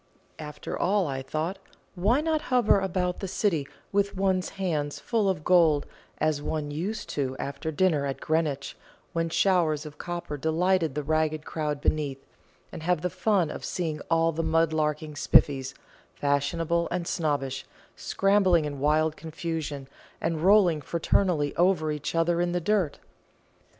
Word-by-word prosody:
"After 150 -2 -6
all," 195 +1 +1
I 135 -3 -3
thought, 155 +8 -3 0.3
"why 210 +10 +2
not 315 -1 0
hover 245 -5 +4
about 180 -1 -1
the 195 - -4
City 185 -6 0 0.2
with 200 -1 0
one's 190 -1 +1
hands 155 -6 -1
full 220 -4 0
of 180 -5 -2
gold, 165 -5 +4 0.3
as 155 -1 0
one 150 0 -3
used 195 +8 -3
to 130 -2 -2
after 140 +3 -4
dinner 155 -3 +2
at 135 - -4
Greenwich, 155 -4 -1 0.4
when 165 0 0
showers 165 -4 +2
of 150 -1 -10
copper 175 -4 -5
delighted 160 +1 +1
the 150 - -2
ragged 155 0 0
crowd 150 -2 -3
beneath, 140 -3 -1 0.5
and - - -7
have 175 -1 +1
the 180 0 -1
fun 185 -4 +1
of - - -7
seeing 160 -4 -3
all 165 0 +3
the 165 +1 -2
mud 165 0 +2
larking 150 0 -1
Spiffys, 135 -2 +3 0.4
fashionable 155 +4 0
and 175 -1 -2
snobbish, 140 -5 -1 0.3
scrambling 195 -5 +2
in 145 -2 -5
wild 155 +2 +2
confusion, 160 -4 -5 0.3
and 165 -1 -1
rolling 185 -4 +5
fraternally 165 0 +1
over 175 -3 +3
each 150 +2 -4
other 170 +1 +2
in 175 0 0
the 175 - +1
dirt? 185 -4 0
160 Hz, 150 wpm, -27 LUFS, 150-180 Hz, 0.5 s, rolling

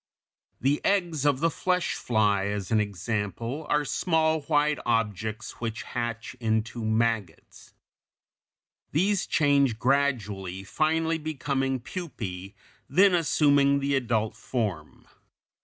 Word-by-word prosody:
The 140 +3 +1
eggs 175 -7 +1
of 140 -1 +2
the 165 0 +2
flesh 180 +2 0
fly, 105 -4 +1
as 100 -1 -3
an 110 - +4
example 105 - -3
(Fig. - - -13
221), 150 - +2
are - - -6
small, 160 -1 +1
white 150 -1 +1
objects 110 -1 -1
which 115 +1 -3
hatch 120 0 -4
into 110 0 -1
maggots. 110 -5 -2 1.2
These 195 +5 +1
change 140 -5 +3
gradually, 105 -9 0
finally 160 +7 0
becoming 135 -3 -1
pupæ, 110 - -6 0.3
then 195 +1 +5
assuming 145 -4 +3
the 140 0 -1
adult 115 -5 0
form. 110 -9 -4
130 Hz, 115 wpm, -27 LUFS, 110-150 Hz, 1.2 s, then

